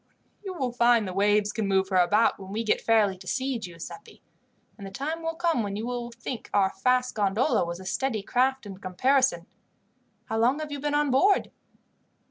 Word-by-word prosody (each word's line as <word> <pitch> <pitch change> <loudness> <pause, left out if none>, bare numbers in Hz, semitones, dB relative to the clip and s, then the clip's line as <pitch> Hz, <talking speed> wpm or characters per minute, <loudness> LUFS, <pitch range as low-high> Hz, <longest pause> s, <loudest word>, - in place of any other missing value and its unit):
"You 385 -2 -5
will 260 -6 -2
find 235 -3 +3
the 185 - -5
waves 205 +1 +2
can 215 -2 -2
move 190 -1 +1
her 190 - +1
about 205 +6 +3
when 190 0 -9
we 220 +3 -2
get 215 - +1
fairly 210 -4 +2
to 185 - -13
sea, 260 +1 -1
Giuseppi, 175 - -10 0.6
and 200 -3 -9
the - - -7
time 300 +11 -4
will 325 0 -3
come 335 -6 +1
when 200 -2 -3
you 215 +2 -4
will 240 -1 -4
think 235 0 -7
our 195 -1 +3
fast 250 +5 +1
gondola 215 +5 +1
was 170 +1 -5
a 190 - -10
steady 220 +1 -2
craft 260 +3 +1
in 195 -2 -9
comparison. 195 0 +1 0.8
How 220 - -2
long 245 +5 +3
have 310 -1 -6
you 285 - -4
been 290 +1 -1
on 295 -2 +2
board?" 385 +10 +3
230 Hz, 200 wpm, -26 LUFS, 195-265 Hz, 0.8 s, find